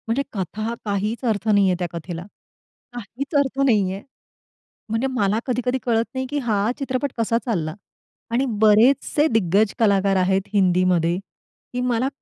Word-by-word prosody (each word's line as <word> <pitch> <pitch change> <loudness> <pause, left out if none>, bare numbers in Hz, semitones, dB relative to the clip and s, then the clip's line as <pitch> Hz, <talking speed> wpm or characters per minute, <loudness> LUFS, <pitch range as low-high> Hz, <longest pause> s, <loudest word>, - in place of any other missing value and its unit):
म्हणजे 240 +5 0
कथा 215 +3 -3
काहीच 210 +4 -2
अर्थ 215 0 -2
नाहीये 200 -3 +4
त्या 175 - -1
कथेला. 170 0 -6 0.7
काहीच 245 - -6
अर्थ 270 -1 -1
नाहीये. 200 -6 +1 0.9
म्हणजे 225 +4 0
मला 215 -5 0
कधी-कधी 250 +1 0
कळत 230 -2 +2
नाही, 260 0 -2
की 295 - -2
हा 210 0 +1
चित्रपट 275 0 -2
कसा 230 0 +1
चालला. 170 -10 -2 0.6
आणि 250 +4 +1 0.2
बरेचसे 245 +8 +4
दिग्गज 205 - +2
कलाकार 200 -3 +3
आहेत 190 +1 +2
हिंदीमध्ये 180 -3 +2 0.6
की 250 - -2
मला 240 +2 +1
215 Hz, 140 wpm, -22 LUFS, 190-245 Hz, 0.9 s, नाहीये